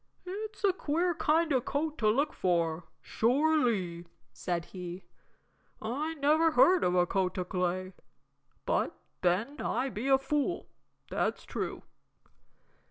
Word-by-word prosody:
"It's 420 +3 -6
a 390 -2 +4
queer 345 +1 0
kind 320 +1 +2
of 255 -2 +1
coat 305 +2 -2
to 215 - +3
look 280 +7 +1
for, 170 -2 0 0.2
sure 285 +8 +2
ly," 180 -8 -1 0.3
said 170 -2 -2
he, 180 0 -7 0.8
"I 285 +9 -3
never 310 +2 +3
heard 355 +8 +5
of 180 - +2
a 180 -1 +4
coat 185 0 -1
o' 180 - 0
clay. 185 +1 -2 0.7
But - - 0 0.2
then 205 - 0
I 270 - 0
be 235 +2 -4
a 270 -1 +6
fool, 295 +5 -1 0.4
that's - - -1
true." - - -4
255 Hz, 135 wpm, -30 LUFS, -, 0.8 s, a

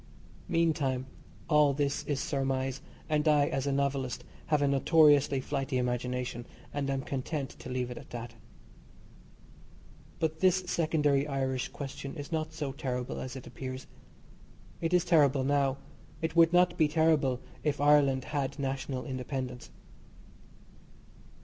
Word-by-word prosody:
Meantime, 150 -6 +1 0.4
all 150 -2 +5
this 145 0 0
is 145 -2 -1
surmise, 135 -1 -1 0.3
and 150 0 +1
I, 150 -2 +5
as 135 0 -2
a - - +1
novelist, 135 -2 -1 0.2
have 150 -2 +2
a - - +3
notoriously 145 -1 +4
flighty 135 0 -2
imagination, 125 -1 -2 0.3
and 140 -1 -2
am 135 -1 -1
content 135 +1 -3
to - - -8
leave 125 -1 -2
it 125 - -6
at - - -14
that. 120 -1 -7 1.8
But 160 -1 -1
this 185 +1 +3
secondary 150 -5 +1
Irish 130 -2 -1
question 140 0 -7
is 145 -2 -7
not 155 -1 -1
so 155 -4 -4
terrible 125 -2 -3
as 130 +1 -6
it 130 - -8
appears. 130 0 -7 1.0
It 165 0 0
is 180 -1 +3
terrible 145 -6 +4
now, 140 -1 +2 0.4
it 160 0 -3
would 165 0 +6
not 180 0 +3
be 155 - +5
terrible 150 -5 +2 0.2
if 150 -2 0
Ireland 145 -3 +4
had 140 -1 -3
national 135 -1 -3
independence. 130 -2 -5
140 Hz, 135 wpm, -30 LUFS, 130-150 Hz, 1.8 s, would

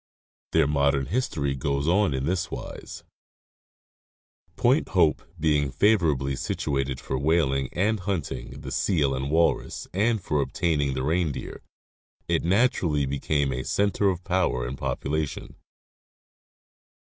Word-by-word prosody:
Their - - +4
modern 70 -1 +2
history 75 - -1
goes 70 +2 -1
on 90 -4 +3
in 65 0 -2
this 85 +1 -1
wise: - - -8 1.5
Point - - +2
Hope 75 - +4 0.2
being 75 -3 +2
favorably 75 - +2
situated 70 -1 -2
for 65 - -3
whaling 70 -4 +1
and 105 +4 +1
hunting 90 -4 -4
the - - -7
seal 75 -8 +1
and 65 +1 -2
walrus 80 +2 +1
and 110 +4 +2
for 75 -5 0
obtaining 70 0 0
the 65 - -2
reindeer, 80 0 -2 0.7
it - - +1
naturally 90 - +2
became 70 0 0
a 65 +1 -3
center 100 0 +1
of 90 -1 -3
power 90 -10 0
and 65 - -4
population. 70 +3 -3
75 Hz, 120 wpm, -26 LUFS, 70-90 Hz, 1.5 s, Their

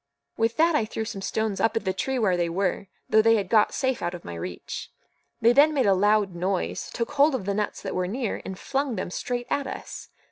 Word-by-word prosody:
With 225 +1 0
that 330 +1 +4
I 265 -8 +2
threw 220 0 -4
some 200 -3 -6
stones 220 0 -1
up 225 0 +2
at 220 - -3
the 190 - +1
tree 265 +7 -2
where 205 -7 +2
they 175 -1 0
were, 190 +2 -1 0.2
though 220 - +5
they 225 +1 +5
had 200 -4 -1
got 215 -2 +5
safe 260 -2 -1
out 175 +1 -2
of 175 - -11
my 85 - -6
reach. 85 +1 -6 0.5
They 230 +1 +6
then 300 +4 +5
made 270 - +2
a 200 - +5
loud 205 0 +2
noise, 185 +2 -2
took 230 +3 -3
hold 290 0 +4
of 230 - -4
the 200 - 0
nuts 210 +1 -2
that - - -4
were 180 0 -1
near, 230 +3 -3
and 190 - -6
flung 275 0 -2
them 175 - -4
straight 245 +5 -3
at 280 -1 0
us. - - -7
215 Hz, 245 wpm, -26 LUFS, 190-250 Hz, 0.5 s, They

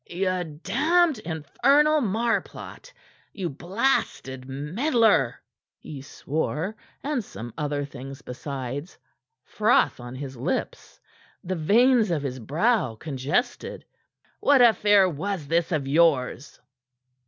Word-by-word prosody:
"You 185 0 -1 0.2
damned, 335 -4 +2
infernal 275 - +2
marplot! 230 - -2 0.4
You 190 -5 -3
blasted 160 - -1
meddler!" 185 - +1 0.4
he 145 -3 -9
swore, 160 +7 -3 0.3
and 285 -5 -1
some 120 - -9
other 145 -2 -2
things 135 0 -10
besides, 135 +4 -6 0.5
froth 215 - +2
on 120 +1 -8
his 135 0 -7
lips, 120 - -4 0.4
the 185 - -3
veins 225 +7 +4
of 160 -5 -1
his 130 -2 -4
brow 155 - +1
congested. 140 - -3 0.5
"What 285 -2 +4
affair 205 -4 +5
was 175 +1 -3
this 165 +2 +1
of 150 -5 -1
yours?" 140 -4 +1
165 Hz, 105 wpm, -25 LUFS, 140-220 Hz, 0.5 s, affair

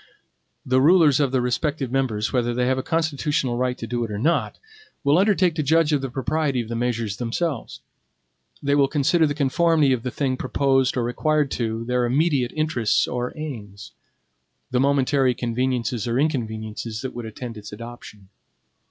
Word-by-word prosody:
The 130 +1 +3
rulers 155 -2 +5
of 140 -3 +2
the 130 -1 +1
respective 135 +2 -1
members, 125 -6 -1
whether 120 -2 0
they 125 0 +1
have 130 +1 +1
a - - 0
constitutional 150 -4 -1
right 125 0 -1
to - - -6
do 120 +1 -2
it 115 - -4
or 105 - -4
not, 155 +11 0 0.5
will 145 +4 +4
undertake 195 -3 +3
to 155 - -1
judge 160 +1 +3
of 145 - +2
the 135 - -3
propriety 140 +1 -1
of 115 -2 -4
the 115 - -3
measures 115 -4 -2
themselves. 125 +3 -3 0.8
They 140 0 +1
will 140 -1 +4
consider 155 +3 +2
the 145 - -2
conformity 150 0 +3
of 125 - -1
the 125 - -3
thing 130 0 -1
proposed 135 -1 +1
or 120 - +1
required 150 +4 0
to 115 -1 -2
their 125 0 +1
immediate 135 -1 +1
interests 155 -8 +1
or 125 0 -3
aims; 110 -10 -7 0.8
the 125 - +1
momentary 135 -1 +2
conveniences 120 -1 -1
or 120 +1 0
inconveniences 110 -5 -2
that 130 - -4
would 120 -2 -6
attend 115 +2 -7
its 105 -1 -10
adoption. 105 -3 -10
130 Hz, 175 wpm, -23 LUFS, 120-145 Hz, 0.8 s, rulers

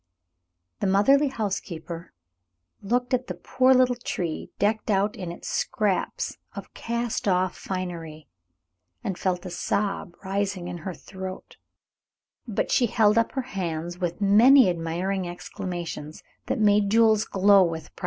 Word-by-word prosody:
The - - 0
motherly 270 +10 +4
housekeeper 180 -8 -5 0.7
looked 245 +5 -1
at 255 0 0
the 180 - -4
poor 255 +9 +2
little 255 -1 +5
tree, 180 -9 -4
decked 215 +2 0
out 205 +1 +2
in 180 -3 -5
its 170 - -9
scraps 210 -5 -1 0.2
of - - -9
cast 235 -2 -3
off 185 -1 +2
finery, 170 -5 -6 0.8
and 190 - -2
felt 180 0 -2
a 180 - -6
sob 195 0 -2
rising 195 -2 -2
in 175 -1 -5
her 180 +2 -6
throat, 190 -1 -9 0.9
but 215 - -1
she 245 - +3
held 210 -1 +3
up 230 0 +2
her 265 - -2
hands 175 -5 -4
with 175 0 -2
many 220 +3 +7
admiring 175 +3 -2
exclamations 175 -3 -6 0.2
that - - 0
made 205 -1 +4
Jules 220 -1 +4
glow 195 0 +5
with 165 -3 -4
pride. - - -15
195 Hz, 140 wpm, -25 LUFS, 175-220 Hz, 0.9 s, many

